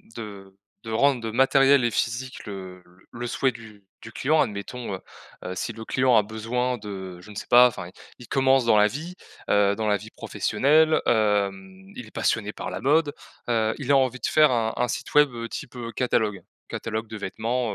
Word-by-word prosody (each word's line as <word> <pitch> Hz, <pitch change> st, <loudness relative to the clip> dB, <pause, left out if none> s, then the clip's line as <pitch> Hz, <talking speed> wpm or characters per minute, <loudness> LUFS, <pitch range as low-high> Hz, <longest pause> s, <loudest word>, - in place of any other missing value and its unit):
de 100 Hz, -3 st, -9 dB, 0.3 s
de 115 Hz, -, -8 dB
rendre, 120 Hz, 0 st, +2 dB
heu, 110 Hz, -, -3 dB
matériel 135 Hz, +2 st, +4 dB
et 120 Hz, -, +1 dB
physique 120 Hz, +4 st, -3 dB
le 95 Hz, -2 st, -8 dB
le 90 Hz, 0 st, -24 dB
le 120 Hz, 0 st, -5 dB
souhait 130 Hz, +2 st, +1 dB
du 110 Hz, -3 st, -14 dB, 0.2 s
du 115 Hz, -, -10 dB
client. 150 Hz, +7 st, +2 dB
Admettons, 105 Hz, 0 st, -4 dB
heu, -, -, -8 dB, 0.5 s
heu, 90 Hz, -, -4 dB
si 115 Hz, -, -3 dB
le 110 Hz, 0 st, -9 dB
client 130 Hz, -2 st, +3 dB
a 105 Hz, -, +4 dB
besoin 115 Hz, +3 st, -2 dB
de, 95 Hz, -4 st, -8 dB
je 105 Hz, -, -15 dB
ne 105 Hz, -, -11 dB
sais -, -, -5 dB
pas. 125 Hz, +1 st, +8 dB
Enfin 110 Hz, -, -6 dB
il -, -, -13 dB, 0.3 s
il 120 Hz, -, -12 dB
commence 135 Hz, -2 st, +3 dB
dans 110 Hz, -, +4 dB
la 105 Hz, 0 st, +6 dB
vie, 160 Hz, +9 st, -6 dB, 0.4 s
heu, 100 Hz, 0 st, +3 dB
dans 110 Hz, +1 st, -3 dB
la 105 Hz, -, +3 dB
vie -, -, -11 dB
professionnelle, 155 Hz, +3 st, +2 dB
hem, 110 Hz, -, 0 dB
il 120 Hz, -, -8 dB
est -, -, -16 dB
passionné 105 Hz, -2 st, -1 dB
par -, -, -6 dB
la -, -, -5 dB
mode. 145 Hz, +2 st, +2 dB, 0.3 s
Heu, 110 Hz, -2 st, +1 dB
il 140 Hz, -1 st, -2 dB
a 140 Hz, -, +6 dB
envie 130 Hz, -1 st, +1 dB
de -, -, -3 dB
faire 155 Hz, -2 st, +5 dB
un 115 Hz, -2 st, 0 dB
un 125 Hz, -, 0 dB
site -, -, -5 dB
web, 150 Hz, -1 st, +6 dB
heu, 115 Hz, 0 st, -5 dB
type, 130 Hz, +2 st, -8 dB
heu, 120 Hz, -1 st, -6 dB
catalogue. 110 Hz, -6 st, 0 dB, 0.3 s
Catalogue 110 Hz, 0 st, -4 dB
de 110 Hz, -, -7 dB
vêtements, 110 Hz, +3 st, -2 dB
115 Hz, 215 wpm, -25 LUFS, 105-130 Hz, 0.5 s, pas